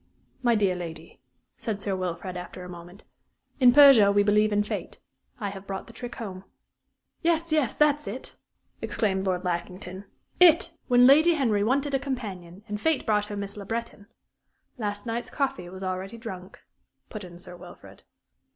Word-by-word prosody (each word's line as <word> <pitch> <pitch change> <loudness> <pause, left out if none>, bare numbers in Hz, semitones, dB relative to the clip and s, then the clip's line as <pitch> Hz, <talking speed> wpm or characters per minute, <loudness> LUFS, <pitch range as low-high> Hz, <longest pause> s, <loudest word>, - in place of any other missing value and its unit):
"My 240 -2 +3
dear 200 -3 +2
lady," 165 -4 -8 0.4
said 215 -3 -3
Sir 200 -1 -2
Wilfrid, 180 0 -4
after 180 +1 -7
a - - -8
moment, 175 +3 -11 0.6
"in 250 -2 +7
Persia 265 -7 +8
we 205 0 +4
believe 210 +1 +3
in 205 0 +2
fate; - - -6 0.4
I 205 -3 -3
have 195 0 -10
brought 195 -1 -5
the 230 - -14
trick 240 +1 -7
home." 190 -4 -7 0.8
"Yes, 335 -1 +1
yes, 300 -7 +1
that's 300 0 +3
it!" 235 +6 -7 0.5
exclaimed 195 -3 -1
Lord 180 -1 0
Lackington 180 +2 -4 0.3
it! 340 -1 +6
When 245 -1 +6
Lady 310 +6 +6
Henry 225 -8 +1
wanted 275 +5 0
a 270 - +2
companion 205 -9 -6
and 210 0 -5
fate 320 -3 +1
brought 210 -1 +2
her 210 -1 -6
Miss 200 0 -5
Le 205 - -7
Breton 225 -1 -5 0.4
" - - -47
"Last 205 -2 -3
night's 235 +1 -3
coffee 265 - -2
was 190 +1 -9
already 190 +4 -4
drunk," 190 -5 -9 0.5
put 215 -2 -6
in 175 -1 -11
Sir 180 0 -11
Wilfrid. 175 - -14
205 Hz, 170 wpm, -26 LUFS, 185-245 Hz, 0.8 s, Persia